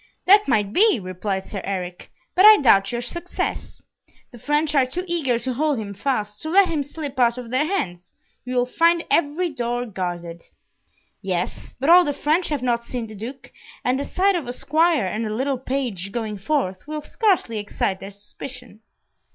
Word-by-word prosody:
"That 405 +3 +6
might 210 -5 +1
be," 425 - +5
replied 190 +1 -3
Sir 195 -1 -6
Eric; 180 -2 -5 0.2
"but 370 - +4
I 430 0 +10
doubt 195 - +4
your 240 0 -2
success. 345 +8 -4 0.5
The 240 - -13
French 295 +3 0
are 270 -3 +3
too 350 +8 -3
eager 315 -9 +1
to 255 +2 -3
hold 295 +2 0
him 205 -2 -5
fast, 210 -2 -2
to 315 - -4
let 385 +3 +5
him 315 -3 -1
slip 285 -1 -6
out 240 0 +3
of 240 -2 -8
their 275 +4 +1
hands. 180 - -4 0.3
You 255 0 -5
will 245 0 +3
find 335 +6 +2
every 335 +3 +1
door 245 -2 -2
guarded." 175 -5 -5 0.8
"Yes, 180 -2 -4
but 275 +6 +3
all 360 +1 +9
the 290 - -1
French 315 +6 0
have 290 -4 -2
not 240 -2 +1
seen 240 0 -4
the 220 - -11
Duke, 235 +6 -9 0.3
and 255 +2 +1
the 280 - -3
sight 390 +1 +2
of 325 -8 -3
a 245 - -3
squire 315 - +2
and 215 +4 -2
a 215 - -3
little 265 +2 -1
page 245 -8 -3
going 215 -2 -4
forth, 195 -4 -2
will 305 0 -4
scarcely 355 - 0
excite 200 -2 -2
their 195 - -8
suspicion." 215 +3 -10
250 Hz, 190 wpm, -22 LUFS, 210-305 Hz, 0.8 s, I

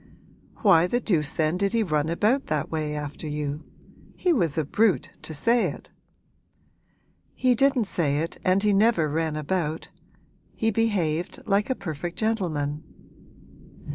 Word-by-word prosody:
'Why 175 -5 +6
the 240 +6 0
deuce 160 -10 0
then 160 +2 0
did 200 +2 0
he 230 -1 +2
run 155 -4 0
about 215 +11 +1
that 150 -2 -2
way 155 -2 -2
after 150 +1 -6
you? 150 0 -3 0.5
He 360 -2 +2
was 170 - 0
a 160 - +1
brute 210 +6 +1
to - - -8
say 230 +10 +3
it!' - - -8 1.4
'He 255 -1 +3
didn't 270 0 +3
say 155 -8 0
it 165 +3 -3
and 190 +2 +2
he 210 -1 +3
never 200 -5 +3
ran 160 +1 -1
about. 155 +1 -2 0.7
He 225 0 +1
behaved 180 -7 0
like 205 +3 +1
a 260 - +1
perfect 175 - -5
gentleman.' 160 -10 -1
170 Hz, 145 wpm, -25 LUFS, 155-215 Hz, 1.4 s, Why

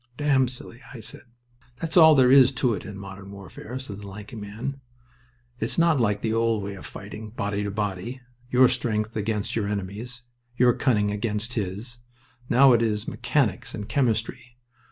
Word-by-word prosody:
"Damn 135 -3 +3
silly," 125 0 -9
I - - -7
said. 110 - -8 0.5
"That's 160 -1 -3
all 160 -3 +9
there 130 -2 +5
is 135 -1 +8
to 125 -3 +1
it 100 - -5
in 105 -2 -7
modern 95 0 -9
warfare," 100 +5 -8
said 110 -7 -7
the 100 - -9
lanky 105 +3 -9
man. 110 +6 -6 0.8
"It's 110 - -2
not 170 -4 +4
like 105 -3 +1
the 110 - 0
old 115 -2 +1
way 100 0 -4
of 95 - -9
fighting, 105 +2 -8
body 105 -2 -2
to 105 - -2
body. 105 +4 -3 0.3
Your 130 +1 +6
strength 110 -2 -1
against 105 -1 -2
your 110 -3 0
enemy's, 105 +5 -5 0.3
your 125 -1 +5
cunning 105 -6 +1
against 105 +2 -2
his. 110 +4 -4 0.5
Now 130 +1 +7
it 115 - +4
is 105 -2 0
mechanics - - -1
and 105 -1 -6
chemistry. 120 0 -1
110 Hz, 175 wpm, -25 LUFS, 105-125 Hz, 0.8 s, all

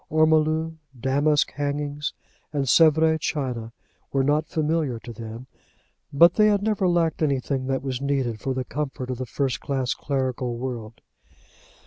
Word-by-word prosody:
Ormolu, 155 +1 +2 0.2
damask 145 +4 +2
hangings, 145 0 -2 0.4
and 140 -2 -1
Sevres 160 +2 +5
china 125 -7 -3 0.4
were 135 -1 +2
not 150 +3 +1
familiar 155 -5 0
to 115 +1 -9
them; 115 +2 -8 0.7
but 170 +5 +6
they 215 -1 +4
had 205 -1 +2
never 210 -3 +1
lacked 170 -3 +1
anything 135 -2 0
that 135 0 -1
is 130 -1 -3
needed 135 -5 -1
for 130 +3 -2
the 130 -1 -2
comfort 130 -1 -4
of 125 - -4
the 130 - -4
first 135 +2 -1
class 135 -2 -1
clerical 130 -3 -2
world. 120 -3 -6
140 Hz, 145 wpm, -24 LUFS, 130-155 Hz, 0.7 s, but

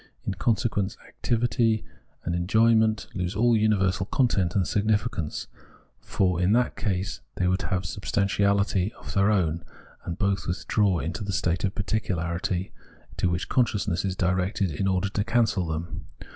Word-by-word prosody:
In - - -1
consequence, 105 -2 0
activity 115 -1 0 0.4
and 85 - -2
enjoyment 110 +4 +3
lose 90 +1 -3
aU 120 +3 +3
universal 100 -4 +2
content 115 - +1
and 95 -4 +2
significance; 105 -5 0 0.5
for 90 -2 0
in 95 +3 +3
that 125 +1 +2
case 95 -2 -2
they 90 - +1
would 95 +1 +1
have 95 -1 -1
a - - -9
sub 100 +4 -6
stantiahty 100 -1 +1
of - - -9
their 100 +1 +3
own: 85 -5 +1 0.4
and 85 - -5
both 100 -1 0
withdraw 95 +1 +1
into 85 +7 -3
the 100 - -3
state 90 -2 0
of 95 -2 -1
particularity, 90 -3 -2 0.4
to 90 - +1
which 85 +1 -2
consciousness 105 -7 +1
is 95 -2 -1
directed 95 0 0
in 95 +6 -1
order 95 +1 +1
to 100 +1 -1
cancel 110 -5 +1
them. 80 +2 -5
100 Hz, 155 wpm, -26 LUFS, 90-110 Hz, 0.5 s, enjoyment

